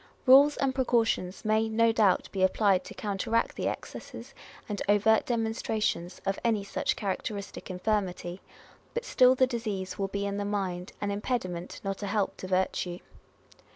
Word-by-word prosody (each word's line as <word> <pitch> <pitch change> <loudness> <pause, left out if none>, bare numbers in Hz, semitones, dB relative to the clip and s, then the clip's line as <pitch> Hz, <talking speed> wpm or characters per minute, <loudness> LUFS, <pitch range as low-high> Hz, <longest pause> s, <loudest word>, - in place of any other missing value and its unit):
Eules 280 +3 +7
and 270 -1 +1
pre 260 0 +1
cautions 225 -7 0
may, 220 +1 +2
no 230 +1 +3
doubt, 215 -4 +3
be 195 - -3
applied 190 0 +3
to - - -10
counteract 215 +3 -1
the - - -2
excesses - - -7 0.3
and 210 -3 -4
overt 210 +2 +4
demonstrations 220 -6 -1
of 195 0 -1
any 220 -4 +1
such 200 - -1
character 205 +2 -3
istic 200 0 -8
infirmity; 185 -2 -2 0.5
but 480 +1 -2
still 255 - +5
the 260 - +4
disease 215 -7 -4
will 195 - 0
be 200 +1 -3
in 200 0 -2
the 205 - -1
mind, 190 -3 -3
an 205 -1 -1
impediment, 195 -5 -3
not 195 0 -3
a 205 - -3
help 200 -1 0
to 185 - -7
virtue. 185 -1 0
205 Hz, 165 wpm, -29 LUFS, 190-225 Hz, 0.5 s, Eules